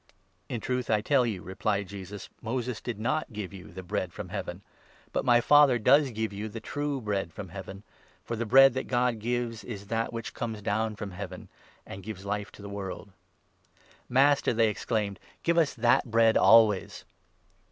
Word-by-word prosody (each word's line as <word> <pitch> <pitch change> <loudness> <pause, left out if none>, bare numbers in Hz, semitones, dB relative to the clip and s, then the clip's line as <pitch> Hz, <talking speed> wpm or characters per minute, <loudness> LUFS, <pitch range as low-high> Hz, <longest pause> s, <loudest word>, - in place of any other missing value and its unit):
" - - -41
"In 120 - -3
truth 125 +1 -2
I 105 -1 +3
tell 130 +1 +3
you," 100 -6 -4
replied 100 +1 -2
Jesus, 100 0 -8
"Moses 120 0 -3
did 115 -4 -5
not 135 +6 -1
give 105 -4 -5
32 100 - -9
you - - -14
the 95 +2 -8
Bread 95 -1 -2
from 90 - -7
Heaven, 95 -1 -5 0.5
but - - 0
my 120 -1 +5
Father 145 -2 +6
does 135 +5 +4
give 110 -2 -3
you 105 +2 -5
the 115 - -7
true 145 +4 -3
Bread 100 -6 -2
from 95 +2 -8
Heaven; 95 +2 -8 0.4
for 115 - -4
the 115 0 -3
Bread 135 +3 +7
that 130 - -3
God 125 -2 +1
gives 120 0 -2
is 105 -5 -6
that 115 0 0
33 115 - -9
which 115 -1 -5
comes 110 -3 -5
down 110 +1 0
from 105 -1 -6
Heaven, 90 - -8 0.4
and 95 - -8
gives 100 -1 -8
Life 105 +1 -3
to 100 - -13
the - - -7
world." 100 0 -6 0.5
" - - -30
Master," 135 +1 +4
they 115 -1 +3
exclaimed, 105 -2 -2
" - - -36
give 170 0 +3
us 160 -4 +1
that 120 +1 +3
Bread 115 0 +4
always 110 -4 +4
110 Hz, 200 wpm, -28 LUFS, 100-120 Hz, 0.5 s, Bread